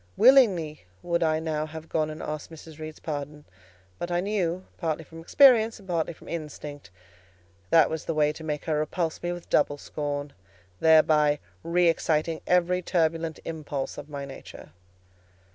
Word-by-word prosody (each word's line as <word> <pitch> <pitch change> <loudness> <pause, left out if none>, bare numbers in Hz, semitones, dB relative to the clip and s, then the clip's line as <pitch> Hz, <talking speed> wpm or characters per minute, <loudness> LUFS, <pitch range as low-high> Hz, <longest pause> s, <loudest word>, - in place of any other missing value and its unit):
Willingly 200 - +5 0.2
would 170 0 0
I 160 -1 +2
now 155 -1 -2
have 160 +1 -9
gone 155 -1 0
and 155 0 -7
asked 150 -1 -5
Mrs. 160 -1 -12
Reed's 155 0 -7
pardon; 150 -1 -5 0.5
but 175 - -3
I 175 0 +1
knew, 185 -2 -1
partly 160 -2 -2
from 165 +2 -12
experience 230 - +5
and 195 - -16
partly 170 -2 -1
from 165 - -15
instinct, 150 -3 -7 0.8
that 165 -2 +6
was 160 -1 -4
the 165 - -2
way 150 0 +3
to 160 - -10
make 150 -2 -3
her 155 -2 0
repulse 160 +1 -2
me 175 - -2
with 175 -1 -8
double 145 -1 +3
scorn, 145 -1 -4 0.5
thereby 155 -2 +5 0.2
re 175 +1 +2
exciting 160 -1 +1
every 180 0 +2
turbulent 165 -2 0
impulse 150 -4 -4
of 145 +1 -10
my 140 -1 -5
nature. 135 - -11
160 Hz, 160 wpm, -27 LUFS, 150-170 Hz, 0.8 s, that